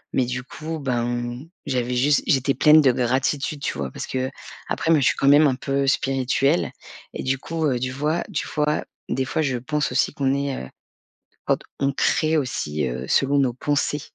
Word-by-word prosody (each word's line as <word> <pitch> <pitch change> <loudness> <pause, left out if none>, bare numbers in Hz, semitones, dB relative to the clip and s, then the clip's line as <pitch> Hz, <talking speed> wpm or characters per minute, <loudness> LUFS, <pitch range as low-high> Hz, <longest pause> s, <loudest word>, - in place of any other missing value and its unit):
mais 130 - +3
du 125 +1 -4
coup, 155 +4 -6
ben, 120 -2 -2 0.3
j'avais 125 -2 -1
juste 140 +3 +3
j'étais 135 0 +2
pleine 155 +1 +7
de 135 -3 +5
gratitude, 135 +4 -1
tu - - -3
vois? 70 -2 -3
Parce - - -6
qu'après, 130 +4 -4
moi, 160 - +5
je - - +2
suis - - +3
quand 135 - 0
même 145 +2 +7
un 130 - +1
peu 140 +1 -1
spirituelle 135 +3 +1 0.4
et - - -5
du 135 +1 0
coup, 160 +3 -2
du 130 +1 -2
vois 150 +5 -1
tu - - -2
fois, 150 0 0 0.2
des 130 +1 -1
fois 145 +4 -1
je 130 -4 0
pense 150 +4 -2
aussi - - +1
qu'on 135 -1 +1
est, 140 -1 -1
heu - - -12 0.8
quand - - +1 0.2
on 140 0 +1
crée 155 +3 +2
aussi, 75 - -2
heu, 65 +1 -4
selon 140 +1 +2
nos 130 -3 +2
pensées. 145 +3 -1
135 Hz, 190 wpm, -23 LUFS, 125-145 Hz, 0.8 s, pleine